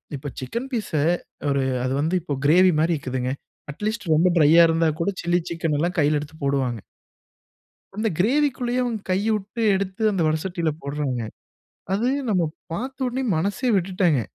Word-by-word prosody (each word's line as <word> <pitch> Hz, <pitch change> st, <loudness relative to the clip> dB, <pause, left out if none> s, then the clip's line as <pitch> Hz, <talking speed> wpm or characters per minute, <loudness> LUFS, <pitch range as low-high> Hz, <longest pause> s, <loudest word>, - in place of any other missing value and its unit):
இப்ப 145 Hz, +1 st, -6 dB
சிக்கன் 235 Hz, -, -4 dB
பீஸ 225 Hz, -5 st, -2 dB, 0.6 s
ஒரு 140 Hz, -1 st, +1 dB, 0.2 s
அது 130 Hz, +1 st, -1 dB
வந்து 160 Hz, +5 st, 0 dB
இப்ப 145 Hz, -4 st, -3 dB
கிரேவி 180 Hz, +5 st, +6 dB
மாரி 165 Hz, +2 st, +2 dB
இருக்குதுங்க. 130 Hz, -1 st, -3 dB, 0.4 s
அட்லீஸ்ட் 210 Hz, +3 st, -4 dB
ரொம்ப 165 Hz, +4 st, +4 dB
டிரையா 160 Hz, +2 st, +7 dB
இருந்தா 165 Hz, 0 st, +2 dB
கூட, 165 Hz, -, +1 dB
சில்லி 175 Hz, +1 st, +2 dB
சிக்கன் 165 Hz, -3 st, -1 dB
எல்லாம் 175 Hz, +4 st, -1 dB
கையில 150 Hz, 0 st, +3 dB
எடுத்துப் 155 Hz, +1 st, -11 dB
போடுவாங்க. 130 Hz, -5 st, 0 dB, 1.2 s
அந்த 220 Hz, +1 st, 0 dB
கிரேவிக்குள்ளயே 250 Hz, +2 st, +1 dB
அவங்க 235 Hz, -3 st, -2 dB
கைய 200 Hz, +4 st, +1 dB
உட்டு 210 Hz, +3 st, -5 dB
எடுத்து 195 Hz, +2 st, -3 dB
அந்த 190 Hz, -4 st, 0 dB
வடசட்டியில 160 Hz, +1 st, 0 dB
போடுறாங்க. 140 Hz, -3 st, -2 dB, 0.7 s
அது 220 Hz, +5 st, +1 dB, 0.2 s
நம்ம 185 Hz, -5 st, +2 dB, 0.3 s
பார்த்த 260 Hz, +9 st, -3 dB
உடனே 255 Hz, +2 st, -2 dB
மனசே 200 Hz, +9 st, 0 dB
விட்டுடேங்க. 180 Hz, -6 st, +2 dB
175 Hz, 150 wpm, -23 LUFS, 150-210 Hz, 1.2 s, டிரையா